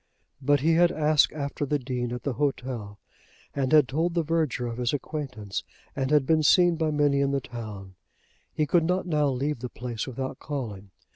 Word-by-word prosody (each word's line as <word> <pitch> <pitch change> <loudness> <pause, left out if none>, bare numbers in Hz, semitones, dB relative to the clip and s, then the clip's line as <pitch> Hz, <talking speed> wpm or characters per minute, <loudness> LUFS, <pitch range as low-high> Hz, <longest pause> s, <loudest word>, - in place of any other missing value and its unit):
But 145 +1 +3
he 165 +3 +3
had 175 +1 +5
asked 150 -1 +3
after 140 -1 -4
the 145 +1 +1
Dean 125 -2 -3
at 125 -1 -5
the 140 - -1
hotel, 125 -6 -3 0.6
and 135 -2 -1
had 150 -4 +6
told 165 +5 -1
the 170 - +2
verger 155 -6 0
of 120 0 -4
his 120 +1 0
acquaintance, 135 -9 -4 0.3
and 135 -1 -1
had 150 -2 +4
been 160 +2 +3
seen 175 +3 +5
by 160 -1 0
many 145 -2 +2
in 140 - +2
the 140 0 +1
town. 105 -7 -8 0.6
He 155 - 0
could 165 +2 +3
not 180 +2 0
now 150 -4 +1
leave 135 +1 -1
the 125 +1 -5
place 120 -3 -5
without 130 +1 -5
calling. 110 -9 -5
140 Hz, 195 wpm, -26 LUFS, 125-155 Hz, 0.6 s, had